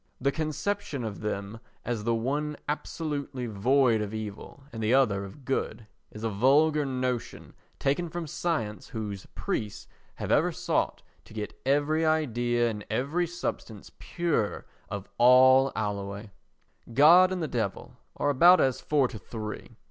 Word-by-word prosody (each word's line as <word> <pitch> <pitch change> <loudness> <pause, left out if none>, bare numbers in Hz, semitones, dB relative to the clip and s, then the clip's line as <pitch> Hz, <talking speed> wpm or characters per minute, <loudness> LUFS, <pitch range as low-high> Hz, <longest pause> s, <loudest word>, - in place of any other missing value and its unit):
The 140 +2 +1
conception 155 -1 -3
of 110 -3 -5
them 105 0 -4 0.3
as 115 -3 -3
the 115 0 +2
one 145 +6 -2
absolutely 145 -3 -3
void 120 +2 +2
of 105 +1 -4
evil 110 +5 -7
and 115 - -5
the 110 +4 +3
other 105 -8 +2
of 110 +8 -11
good 130 -4 -2 0.2
is 110 - -10
a 115 - 0
vulgar 145 +7 +3
notion 130 -2 -3 0.2
taken 145 +5 0
from 175 +1 -4
science 150 -9 -3
whose 105 -5 -6
priests 105 -2 -4 0.3
have - - -4
ever - - +3
sought - - -1 0.2
to - - -15
get 105 -1 -4
every 145 +3 +2
idea 120 -7 +1
and 105 -2 -4
every 140 +10 0
substance 160 - -6
pure 165 - -1 0.2
of 100 -1 -5
all 130 +2 +6
alloy. 100 0 -4 0.6
God 170 +9 +7
and 180 -3 -2
the - - -1
Devil 115 -8 -3 0.2
are 145 - +1
about 175 +7 +7
as 130 -2 +1
four 145 -4 +2
to 115 -3 -9
three. 110 +2 -7
125 Hz, 150 wpm, -28 LUFS, 110-150 Hz, 0.6 s, God